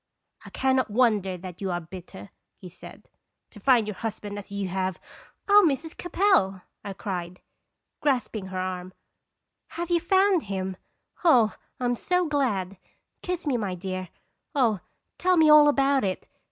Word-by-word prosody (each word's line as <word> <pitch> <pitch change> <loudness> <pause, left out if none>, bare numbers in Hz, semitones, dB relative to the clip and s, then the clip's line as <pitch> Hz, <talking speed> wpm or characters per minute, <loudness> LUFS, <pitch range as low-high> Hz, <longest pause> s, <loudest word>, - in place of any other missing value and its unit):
" - - -26
I - - -9
can 265 0 +1
not 260 - 0
wonder 210 -5 +2
that 180 0 -10
you 195 - -2
are 175 -1 -1
bitter," 170 - -11 0.3
he 185 - -11
said, 180 - -13 0.2
" - - -56
to - - -13
find 250 -5 +4
your 210 - -3
husband 210 -2 -5
as 200 0 -12
you 200 -1 -3
have 185 0 -2 0.2
" - - -30
"Oh, 410 0 +7
Mrs. 310 +4 -4
Capel!" 350 - +1 0.2
I 200 - -5
cried, 180 -1 -5 0.6
grasping 245 -8 -1
her 190 0 -6
arm, 185 0 -4 0.4
" - - -57
have 345 +1 -3
you 345 - +4
found 380 +1 +3
him? 190 -1 -3 0.5
Oh, 240 - +5 0.2
I'm 245 -1 0
so 360 +8 0
glad! 215 - -1 0.4
kiss 360 -2 -4
me, 275 -4 +1
my 200 -5 -3
dear. 185 0 -5 0.5
Oh, 230 -8 +2 0.4
tell 365 0 +3
me 315 -2 +6
all 300 -1 +8
about 275 -2 +2
it! 190 -2 -3
210 Hz, 170 wpm, -26 LUFS, 185-290 Hz, 0.6 s, all